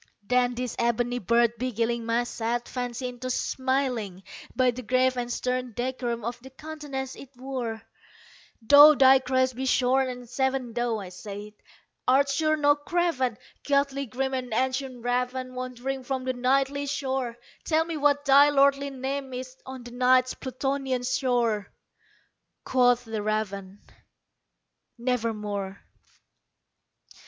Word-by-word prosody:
Then 250 +2 +1
this 250 -1 -3
ebony 240 +1 0
bird 235 +2 +3
beguiling 235 -1 -1
my 230 +1 +2
sad 240 0 -3
fancy 250 0 -4
into 250 +1 -6
smiling, 255 -8 -1 0.3
By 255 0 +3
the 250 +1 -7
grave 255 +2 +2
and 245 -1 -3
stern 250 0 -2
decorum 240 -1 -3
of 235 +1 -4
the 265 - -11
countenance 280 -2 -6
it 275 - -11
wore, 245 -4 -4 0.8
"Though 290 +5 +9
thy 265 -1 +7
crest 260 -1 +1
be 265 +1 -3
shorn 260 +1 +2
and 245 -1 -7
shaven, 265 -1 -1
thou," 240 -1 0
I 195 -3 -7
said, 205 +2 -8 0.5
"art 275 +2 +4
sure 310 +2 +1
no 290 -1 +4
craven. 290 -6 0 0.2
Ghastly 280 -1 0
grim 265 +4 -2
and 255 -2 -3
ancient 260 -1 -2
raven 250 +1 -1
wandering 255 +1 -4
from 260 0 -3
the 255 0 -1
Nightly 275 +3 +1
shore 265 -4 -2 0.3
Tell 320 0 +2
me 335 -1 -4
what 290 -1 +2
thy 280 +1 +7
lordly 280 0 +3
name 270 0 -4
is 255 0 -7
on 260 -1 -7
the 240 - -10
Night's 255 +1 +3
Plutonian 265 -1 -2
shore!" 240 -5 0 0.9
Quoth 245 -1 +3
the 220 -1 -4
raven, 205 -2 -3 1.1
"Nevermore." 210 -5 -2
255 Hz, 135 wpm, -26 LUFS, 240-270 Hz, 1.1 s, Though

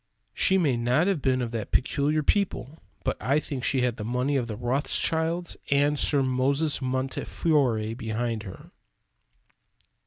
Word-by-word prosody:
She 190 - +3
may 145 -9 +2
not 125 +7 +2
have 190 -6 0
been 130 -1 +1
of 115 - -4
that 115 -3 -4
"peculiar 150 +4 +1
people," 160 - -1 0.2
but - - 0
I 140 +6 +2
think 135 -4 -5
she 130 0 +1
had 125 -1 0
the 105 - -5
money 125 +5 0
of 120 -3 -1
Rothschilds 160 +8 -1
and 145 +1 +2
Sir 140 -2 +3
Moses 140 +4 +1
Montefiore 130 -2 0
behind 115 0 -3
her. 95 -4 -11
130 Hz, 145 wpm, -26 LUFS, 120-150 Hz, 0.2 s, She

